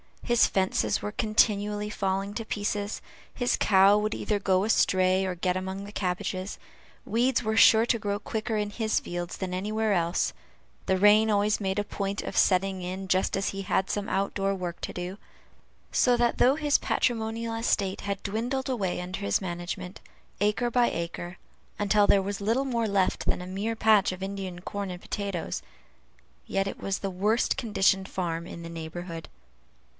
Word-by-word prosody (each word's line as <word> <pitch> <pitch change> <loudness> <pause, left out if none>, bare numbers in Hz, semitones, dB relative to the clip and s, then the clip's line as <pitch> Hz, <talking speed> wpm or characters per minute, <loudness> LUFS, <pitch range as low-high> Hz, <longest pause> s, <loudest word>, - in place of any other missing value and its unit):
His 240 -1 +4
fences 190 +2 0
were 210 - -3
continually 210 -1 +1
falling 195 0 -1
to 225 - -4
pieces; 205 0 -2 0.3
his 245 -1 +1
cow 195 +1 +5
would 215 +1 -1
either 210 -1 -1
go 190 -1 +2
astray, 185 -3 +3
or 185 -1 -2
get 180 +1 0
among 190 +1 -4
the 205 - -9
cabbages; 185 0 -3 0.5
weeds 240 +3 +1
were 220 0 -1
sure 225 0 +7
to 230 - +2
grow 205 -1 -1
quicker 220 +1 -3
in 210 -1 -1
his 220 +1 0
fields 175 0 -5
than 185 -2 -4
anywhere 215 +3 0
else; 170 -2 +1 0.5
the 190 - +2
rain 210 +3 +6
always 210 0 +2
made 190 -1 -1
a 205 - +1
point 200 -1 -3
of - - -5
setting 190 0 +3
in 185 +1 -5
just 185 +1 +2
as 195 +1 0
he 195 - -4
had 190 0 0
some 205 0 -2
out 195 -1 -1
door 195 0 0
work 175 -2 -5
to - - -4
do; 180 +2 -5 0.7
so 250 -1 +4
that 240 0 +1
though 260 +3 +5
his 295 -2 +3
patrimonial 230 -1 -1
estate 205 -4 0
had 200 -1 -4
dwindled 245 +6 -2
away 195 -9 -1
under 180 +1 -5
his 100 0 0
management, 180 +1 -5 0.4
acre 210 +4 +1
by 245 0 +3
acre, 175 +2 -5 0.4
until 205 0 +3
there 195 -1 +4
was 200 +1 -4
little 230 +7 +1
more 235 -4 0
left 200 -2 +1
than - - +1
a - - -6
mere 200 +5 -3
patch 215 -3 +4
of 185 +1 -6
Indian 195 -2 -5
corn 200 +1 -4
and 180 0 -7
potatoes, 200 -4 -3 0.9
yet 195 0 0
it - - -5
was 195 0 -2
the 195 - -3
worst 210 +6 +1
conditioned 195 -5 +2
farm 170 -3 -3
in 170 - -8
the 165 - -7
neighborhood. 165 +1 -7
200 Hz, 180 wpm, -27 LUFS, 185-215 Hz, 0.9 s, sure